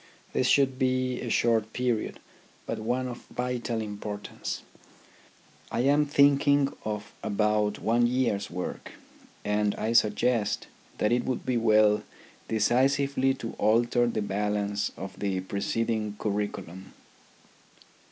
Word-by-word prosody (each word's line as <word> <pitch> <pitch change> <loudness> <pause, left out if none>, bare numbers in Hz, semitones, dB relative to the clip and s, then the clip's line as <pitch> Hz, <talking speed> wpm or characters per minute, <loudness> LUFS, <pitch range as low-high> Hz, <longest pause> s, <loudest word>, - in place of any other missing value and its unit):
This 130 - +2
should 135 -2 +3
be 130 -1 0
a 120 - -4
short 110 -2 +2
period, 125 -3 -1 0.5
but - - -3
one 125 +4 -1
of 120 -1 -8
vital 125 -2 -2
import 105 -1 -6
ance. - - -4 1.1
I 115 - -1
am 145 +3 +3
thinking 140 0 +4
of 105 -1 -4
about 105 0 +1
one 120 +2 +2
year's 120 -5 0
work, 90 +1 -5 0.5
and 105 0 +1
I 110 +2 -1
suggest 115 0 +2 0.3
that 105 - +1
it 120 0 +2
would 130 - -2
be 130 - 0
well 110 -2 +4 0.5
decisively 135 +4 +2
to 115 -3 -6
alter 120 +3 +3
the 110 -3 -1
balance 105 0 -1
of 95 0 -8
the 95 -2 -1
preceding 105 +2 -2
curriculum. 100 -3 -4
115 Hz, 125 wpm, -28 LUFS, 105-125 Hz, 1.1 s, thinking